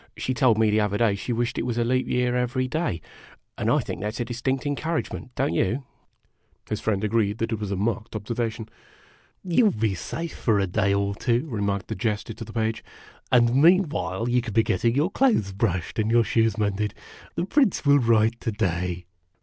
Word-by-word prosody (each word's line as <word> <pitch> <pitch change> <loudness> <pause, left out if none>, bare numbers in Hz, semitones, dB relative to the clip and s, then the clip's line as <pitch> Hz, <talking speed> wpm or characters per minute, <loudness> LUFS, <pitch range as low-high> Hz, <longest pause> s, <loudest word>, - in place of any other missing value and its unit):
She 130 - -1
told 125 -4 +3
me 110 -1 +3
the 105 - +3
other 105 -1 0
day 115 -1 +3
that 100 - -2
she 105 - -4
wished 120 0 -1
it - - -1
was 120 -2 -2
leap 125 +2 +1
year 125 0 +1
every 125 +1 0
day; 140 - -2 0.5
and - - -1
I - - +4
think - - -6
that 105 +1 -3
's - - -7
a 120 - -1
distinct 125 +3 -2
encouragement, 145 -2 -3
don't - - 0
you? 115 +10 0 0.4
" - - -35
His 105 - -2
friend 105 -2 0
agreed 105 -1 +1
that 115 0 -2
it 110 - -1
was 105 -2 -4
a 100 - -1
marked 110 +3 -2
observation. 110 +1 -3
o - - -32 0.4
" - - -33
You 245 - +5
'11 195 - +1
be 110 -3 +1
safe 165 - -5
for 110 -3 +1
a 100 - +2
day 100 +2 +1
or 100 0 +1
two," 120 +5 0
remarked 100 -6 -2
the - - -3
Jester 105 +2 -2
to 115 - -8
the - - -10
Page; 110 -1 -1 0.2
" - - -25
and 120 -1 +4
meanwhile 155 - +3
you 125 0 +2
can 115 -3 -6
be 115 - +5
getting 115 +5 +1
your 155 +7 +1
clothes 220 - +2
brushed 95 -2 -1
and 110 0 +1
your 115 0 +4
shoes 115 -1 +1
mended. 105 -1 -1 0.4
The - - -1
Prince 245 - +2
will 145 0 +6
write 115 -1 +2
to 115 - -1
day." 90 -4 -2
115 Hz, 220 wpm, -25 LUFS, 105-125 Hz, 0.5 s, will